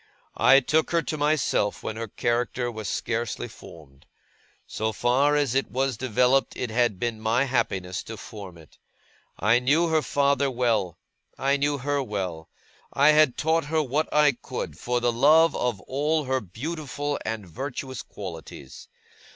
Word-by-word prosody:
I 135 +1 +6
took 155 +4 +1
her 170 -1 +1
to 155 - -3
myself 145 -8 0
when 110 - -4
her 115 +1 -4
character 120 +2 -1
was 110 -3 -6
scarcely 115 +1 -2
formed. 75 - -15 0.6
So 110 +1 -2
far 130 +7 +2
as 145 -5 +1
it 135 +1 0
was 135 0 -1
developed, 125 +3 +1
it 125 -3 -3
had 120 -3 +1
been 115 0 -3
my 115 +4 +2
happiness 95 -8 -1
to 110 - -7
form 100 -4 -10
it. 80 -2 -18 0.6
I 115 +5 +3
knew 150 +7 +2
her 160 -1 +2
father 140 -1 +1
well. 115 -9 0 0.4
I 135 +1 +2
knew 145 +1 0
her 140 +2 -1
well. 95 -9 -4 0.4
I 140 +2 +4
had 150 -4 +4
taught 160 0 +1
her 155 +1 +1
what 145 +3 -1
I 150 -1 +5
could, 120 - -6
for 120 +8 -1
the 120 0 +1
love 155 +6 +5
of 120 -6 -1
all 150 - 0
her 130 -1 -1
beautiful 145 - -4
and 110 -2 -4
virtuous 130 - -5
qualities. 80 -8 -9
125 Hz, 160 wpm, -25 LUFS, 110-145 Hz, 0.6 s, I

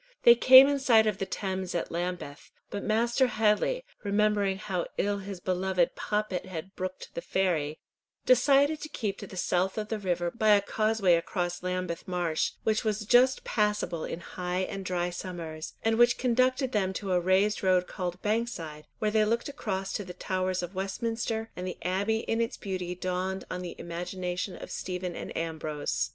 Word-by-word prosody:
They 235 - +10
came 260 +3 +9
in 285 -1 +1
sight 230 -5 +5
of 210 -3 0
the 195 - -2
Thames 190 -2 -3
at 170 - -2
Lambeth, 175 -4 -4 0.2
but 200 - -3
Master 235 +4 +2
Headley, 225 - +1 0.2
remembering 205 -1 +2
how 190 -4 -3
ill 200 0 0
his 195 -1 -7
beloved 185 -1 0
Poppet 210 -3 -2
had 185 +1 -7
brooked 185 0 -6
the - - -4
ferry, 160 -6 0 0.5
decided 280 +4 +4
to 310 - -6
keep 205 -8 -3
to - - -7
the 190 - -10
south 180 +2 0
of 210 -1 -3
the 220 - -2
river 175 -3 -1
by 215 -2 +4
a 200 - +3
causeway 215 -2 +2
across 175 +1 -1
Lambeth 180 -2 -3
marsh, 175 -3 0
which 220 -1 +1
was 215 -1 -1
just 255 +4 +4
passable 210 -6 0
in 170 - -5
high 180 +1 -3
and 195 0 -4
dry 180 -1 -1
summers, 170 -3 -6
and 225 0 +2
which 240 0 +5
conducted 255 +1 +2
them 190 -4 0
to 195 -1 -4
a 180 - +4
raised 190 +4 +2
road 185 -1 +3
called 180 -2 -4
Bankside, 205 -9 -2
where 215 -1 0
they 215 0 +4
looked 230 +5 0
across 195 -9 -3
to 205 - -2
the 180 -2 -9
towers 185 0 -1
of 175 +2 -6
Westminster, 225 +3 -2
and 180 +1 -5
the 180 - -5
Abbey 200 +5 0
in 225 0 -1
its 230 - -2
beauty 185 -2 -4
dawned 185 +1 -3
on 180 - -3
the 180 - -6
imagination 180 +2 -4
of - - -9
Stephen 180 -1 -4
and - - -6
Ambrose. 160 -2 -2
190 Hz, 180 wpm, -29 LUFS, 180-220 Hz, 0.5 s, They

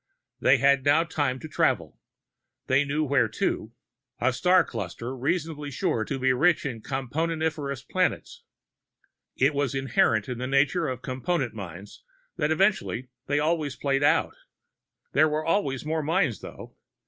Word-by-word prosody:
They 130 - +5
had 140 0 +3
now 145 +4 +4
time 145 -6 -1
to 155 - -7
travel, 155 - 0 0.7
they 135 +2 +3
knew 145 +2 -1
where 135 -5 +2
to 110 +1 -2 0.5
a 130 0 +2
star 180 +6 +4
cluster 115 - -5
reasonably 150 +1 -2
sure 115 -4 -1
to 135 - -3
be 130 0 +2
rich 155 +6 +2
in 120 -5 -4
Componentiferous 145 +1 -2
planets. 185 -1 -1 0.9
It 140 +3 +3
was 140 -2 -1
inherent 120 -5 +2
in 125 -2 -5
the 130 - -3
nature 135 +1 +2
of 130 -1 -5
Component 130 0 -2
mines 95 -1 -9 0.3
that 150 - +1
eventually 160 - +1 0.2
they 145 - +1
always 150 -2 0
played 135 -1 0
out. 145 - +2 0.8
There 155 +2 +4
were 155 +1 -2
always 145 - 0
more 160 +1 -1
mines, 155 - +1
though. - - -10
140 Hz, 150 wpm, -26 LUFS, 130-155 Hz, 0.9 s, They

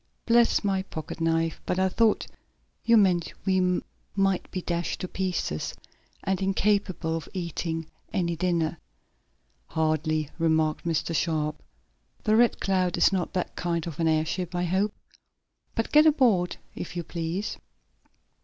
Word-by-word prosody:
Bless 235 -1 +4
my 195 -2 +1
pocket 160 -3 -7
knife, 165 0 +1
but - - 0
I 190 0 +3
thought 220 +3 +2 0.6
you 230 0 +5
meant 180 -5 +3
we 185 -2 +2 0.3
might 195 -2 +1
be 185 - -4
dashed 170 0 -2
to 185 - -2
pieces, 180 - -2 0.5
and 190 0 0
incapable 195 -4 +1
of 165 -3 -5
eating 165 -2 -3 0.3
any 175 -4 0
dinner." 170 -2 0 0.9
"Hardly," 155 -1 0
remarked 160 -1 +1
Mr. 165 0 0
Sharp. 155 -2 0 0.6
"The 215 0 +3
Red 240 +1 +4
Cloud 185 -2 +1
is - - +4
not 180 -3 -1
that 180 - -2
kind 170 -2 -1
of 165 -3 -6
an 165 - +2
airship, 160 +3 0
I 175 - 0
hope. 190 +4 +1 0.8
But 225 - -1
get 305 +1 +7
aboard, 235 - +3 0.2
if 175 - -7
you 175 - -2
please." 170 +4 -3
175 Hz, 140 wpm, -27 LUFS, 165-195 Hz, 0.9 s, get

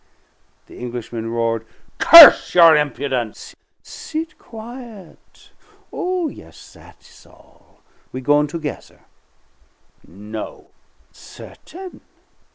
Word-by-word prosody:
The - - -16
Englishman 120 -2 -7
roared, 115 -1 -3 0.4
"Curse 330 - +8
your 165 -2 +7
impudence!" 135 -5 -4 0.3
"Sit 315 0 -8
quiet. 230 -4 -14 0.4
Oh, 360 -2 -3
yes, - - -14
that's - - -20
all; - - -26 0.3
we 130 - -7
goin' 145 +3 +1
together." 150 0 -9 1.1
"No!" 105 +4 -10 0.4
"Certain. 370 +1 -14
150 Hz, 80 wpm, -18 LUFS, -, 1.1 s, Curse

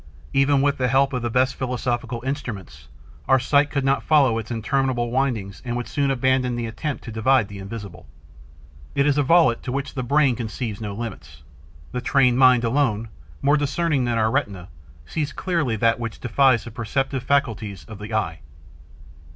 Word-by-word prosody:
Even 135 0 +3
with 140 -1 +1
the 125 - +2
help 135 +2 +2
of 125 - -1
the 120 - -2
best 130 +3 +2
philosophical 125 -2 -3
instruments, 105 - -5 0.4
our 130 - +5
sight 145 +3 +2
could 140 -2 -1
not 135 0 +2
follow 135 -7 +3
its 110 - -8
interminable 120 +1 -1
windings 120 -7 -1
and 120 -1 -3
would 120 - -4
soon 140 -1 0
abandon 130 -1 +1
the 120 -1 -3
attempt 130 +6 -4
to 115 - -7
divide 115 +1 +2
the 100 -1 -8
invisible. 100 -2 -8 0.9
It 140 - +3
is 145 0 +2
a - - +5
volute 145 -4 +4
to 125 - -5
which 140 +1 -3
the 130 - -3
brain 140 0 +2
conceives 115 -2 -5
no 105 -2 -4
limits. 75 - -8 0.5
The 125 - -3
trained 125 -1 +3
mind, 130 -2 +6
alone, 115 -3 0 0.3
more 145 +2 +4
discerning 145 -1 0
than 120 -1 0
our 110 0 +2
retina, 100 -10 -2 0.4
sees 150 - -3
clearly 165 -11 -1
that 115 +2 +2
which 115 -2 -5
defies 125 -1 +3
the 120 - -9
perceptive 130 +4 -2
faculties 110 - -1
of 105 +4 -10
the 105 +2 -8
eye. 85 -7 -1
125 Hz, 180 wpm, -23 LUFS, 110-135 Hz, 0.9 s, mind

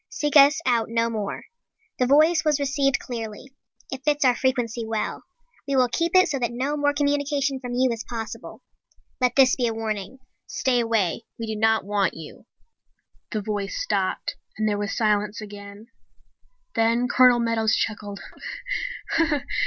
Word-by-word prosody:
Seek 295 0 -2
us 285 +2 +7
out 235 -3 +2
no 230 0 0
more. 210 -3 -4 0.6
The 250 - +2
voice 310 +4 +4
was 300 -2 +2
received 275 -1 +1
clearly. 230 +1 -7 0.4
It 265 0 -6
fits 295 -1 +2
our 250 -1 +5
frequency 245 -3 -1
well. 220 -1 -3 0.4
We 280 - 0
will 255 -2 +4
keep 335 +8 -1
it 370 0 +6
so 275 - -2
that 240 -2 0
no 265 +5 -2
more 290 -1 +2
communication 285 -1 0
from 245 -1 -5
you 255 0 +2
is 230 -1 -4
possible. 225 -2 -7 0.6
Let 250 -1 +2
this 260 -2 +5
be 245 -2 0
a 225 - -2
warning. 215 +1 -4 0.3
Stay 255 -3 0
away! 225 -3 0
We 230 - -4
do 220 -1 -4
not 220 -1 +2
want 200 -2 0
you!_" 160 -2 -11 0.9
The 215 - -2
voice 205 - -3
stopped - - -1 0.2
and 215 0 0
there 205 -1 0
was 205 -1 -3
silence 210 -1 +1
again. 205 0 -10 0.9
Then 230 +2 +2
Colonel 250 -1 +5
Meadows 230 -2 +1
chuckled. 205 -2 -3
240 Hz, 160 wpm, -24 LUFS, 220-275 Hz, 0.9 s, us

